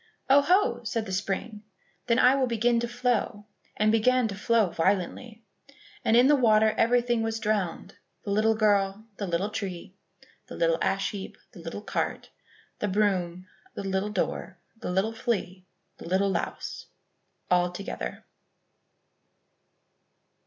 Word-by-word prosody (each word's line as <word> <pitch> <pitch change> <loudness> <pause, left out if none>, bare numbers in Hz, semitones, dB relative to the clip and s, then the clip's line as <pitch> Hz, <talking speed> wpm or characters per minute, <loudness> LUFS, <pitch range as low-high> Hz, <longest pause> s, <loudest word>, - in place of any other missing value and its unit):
"Oh, 280 +1 +7
ho!" 285 -7 +2
said 220 0 -2
the 190 - -7
spring, 205 +3 -3 0.5
"then 235 -1 +3
I 250 +1 +6
will 270 -2 +1
begin 235 0 +2
to 235 - -2
flow," 240 -4 -1 0.3
and 215 0 +3
began 245 +2 +3
to - - -4
flow 215 -2 +2
violently. 200 +6 -1 0.6
And 225 - +4
in 245 - +6
the 295 +2 +6
water 220 -4 +4
everything 240 0 +2
was 225 0 -2
drowned, 205 -4 -2 0.3
the 215 +2 +2
girl, 205 -1 +2
the 200 - -3
little 180 +4 -1
tree, 185 -3 -5 0.5
the - - -9
little 165 -1 +1
ash 195 0 0
heap, 200 -2 -7
the - - -13
little 165 +5 -7
cart, - - -3 0.5
the 210 - -1
broom, 185 -3 0 0.3
the - - -5
little 195 +1 -1
door, 195 -1 -3 0.2
the 225 - -6
little 190 +5 0
flea, 190 -5 -3 0.3
the - - -10
little 195 +2 +2
louse, - - -4 0.6
all 180 0 +3
together. 195 +3 -6
210 Hz, 140 wpm, -27 LUFS, 190-230 Hz, 0.6 s, Oh